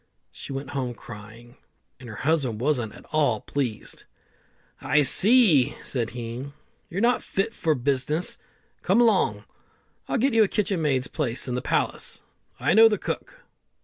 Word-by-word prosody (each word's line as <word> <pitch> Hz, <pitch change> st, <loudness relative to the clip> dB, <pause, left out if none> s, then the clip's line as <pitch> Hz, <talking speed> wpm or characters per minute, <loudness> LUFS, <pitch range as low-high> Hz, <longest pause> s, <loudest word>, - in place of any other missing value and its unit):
She -, -, -10 dB
went 135 Hz, 0 st, -5 dB
home 130 Hz, -4 st, -3 dB
cryin', 115 Hz, +3 st, -12 dB, 0.4 s
and 125 Hz, -2 st, -11 dB
her 110 Hz, -, -8 dB
husband 135 Hz, -4 st, 0 dB
wasn't 120 Hz, -5 st, 0 dB
at -, -, -14 dB
all 145 Hz, -8 st, +2 dB
pleased. 125 Hz, -7 st, -4 dB, 0.8 s
"I 150 Hz, +1 st, +3 dB
see," 170 Hz, -, +4 dB
said 120 Hz, -4 st, -2 dB
he, 120 Hz, +4 st, -6 dB, 0.4 s
"you're 190 Hz, +4 st, -3 dB
not 245 Hz, +2 st, +3 dB
fit 195 Hz, +4 st, -2 dB
for 160 Hz, -7 st, 0 dB
business. 140 Hz, +5 st, -1 dB, 0.4 s
Come 195 Hz, +5 st, +2 dB
along, 235 Hz, -2 st, +3 dB, 0.6 s
I'll -, -, 0 dB
get 265 Hz, +2 st, +2 dB
you 225 Hz, -, +5 dB
a -, -, +2 dB
kitchen 195 Hz, -3 st, -1 dB
maid's 135 Hz, -4 st, +1 dB
place 120 Hz, 0 st, -2 dB
in 125 Hz, -, -2 dB
the 125 Hz, -, -2 dB
palace. -, -, -2 dB, 0.4 s
I -, -, +2 dB
know 225 Hz, +1 st, +8 dB
the 210 Hz, -, 0 dB
cook." -, -, -6 dB
140 Hz, 155 wpm, -25 LUFS, 120-190 Hz, 0.8 s, know